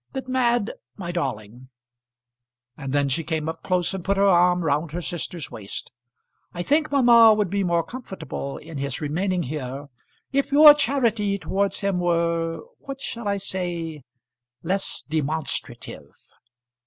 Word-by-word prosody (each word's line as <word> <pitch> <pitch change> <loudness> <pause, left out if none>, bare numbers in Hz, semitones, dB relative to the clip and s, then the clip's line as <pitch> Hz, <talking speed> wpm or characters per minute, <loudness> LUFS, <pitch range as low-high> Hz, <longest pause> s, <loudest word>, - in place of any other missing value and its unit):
But, 265 -1 -5
Mad, 240 -4 +1 0.2
my 175 -3 -5
darling," 125 -6 -4 1.1
and 135 -2 -6
then 140 0 +2
she 140 +5 0
came 155 0 -2
up 160 0 -5
close 180 0 0
and 190 -2 -5
put 200 +2 0
her 200 - +3
arm 180 -1 +4
round 150 +1 0
her 175 - -3
sister's 170 -1 -4
waist. 100 -2 -7 0.6
"I 175 - -2
think 305 - +2
mamma 235 -5 +7
would 205 -4 0
be 200 0 0
more 170 -2 +1
comfortable 165 - -6
in 160 -2 -8
his 140 -2 -2
remaining 175 +4 -1
here 140 0 -5 0.4
if 275 0 +1
your 295 +1 +10
charity 235 -8 +1
towards 200 +1 -1
him 200 -2 0
were 170 -1 0 0.2
what 275 -1 -8
shall 235 -4 -5
I 200 0 +1
say? 175 -5 -4 0.6
less 190 +4 -1
demonstrative." 155 0 -3
175 Hz, 145 wpm, -24 LUFS, 155-205 Hz, 1.1 s, your